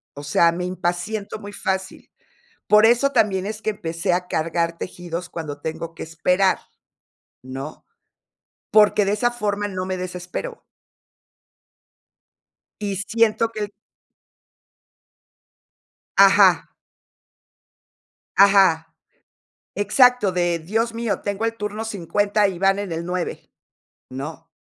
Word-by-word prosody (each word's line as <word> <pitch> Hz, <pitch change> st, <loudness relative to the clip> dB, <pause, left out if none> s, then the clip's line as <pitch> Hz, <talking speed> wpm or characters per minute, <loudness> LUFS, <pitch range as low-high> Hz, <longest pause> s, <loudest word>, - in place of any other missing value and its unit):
o 145 Hz, -, -8 dB
sea, 165 Hz, +3 st, +3 dB
me 180 Hz, +1 st, -4 dB
impaciento 185 Hz, +4 st, -3 dB
muy 205 Hz, -1 st, -9 dB
fácil. 190 Hz, -1 st, -4 dB, 0.6 s
Por 210 Hz, +1 st, +6 dB
eso 245 Hz, +5 st, +4 dB
también 195 Hz, -2 st, +1 dB
es 215 Hz, +1 st, -5 dB
que 215 Hz, -, 0 dB
empecé 170 Hz, -1 st, -3 dB
a 180 Hz, 0 st, 0 dB
cargar 170 Hz, 0 st, -1 dB
tejidos 175 Hz, 0 st, -6 dB
cuando 150 Hz, -3 st, -6 dB
tengo 160 Hz, +1 st, -5 dB
que -, -, -8 dB
esperar, 180 Hz, +4 st, +1 dB, 0.8 s
¿no?, 135 Hz, +4 st, -8 dB, 0.9 s
porque 210 Hz, -1 st, +5 dB
de 195 Hz, -, 0 dB
esa 240 Hz, +3 st, +1 dB
forma 205 Hz, -3 st, -2 dB
no 185 Hz, -2 st, -4 dB
me 185 Hz, 0 st, -3 dB
desespero. 180 Hz, -, -6 dB, 2.2 s
Y 200 Hz, -2 st, -2 dB
siento 225 Hz, +2 st, +1 dB
que 210 Hz, -2 st, -4 dB, 2.5 s
Ajá. -, -, +6 dB, 1.7 s
Ajá. 190 Hz, -5 st, +5 dB, 0.8 s
Exacto, 245 Hz, +1 st, +4 dB
de, 175 Hz, -1 st, 0 dB
Dios 225 Hz, +7 st, -1 dB
mío, 230 Hz, -3 st, -2 dB
tengo 205 Hz, +2 st, -3 dB
el 225 Hz, 0 st, -1 dB
turno 210 Hz, +1 st, -4 dB
50 205 Hz, +1 st, +1 dB
y 180 Hz, -3 st, -5 dB
van 195 Hz, +1 st, +3 dB
en 200 Hz, -4 st, -4 dB
el 165 Hz, +1 st, -3 dB
9, 180 Hz, 0 st, -4 dB, 0.6 s
¿no? 150 Hz, +5 st, -7 dB
195 Hz, 110 wpm, -22 LUFS, 170-210 Hz, 2.5 s, Por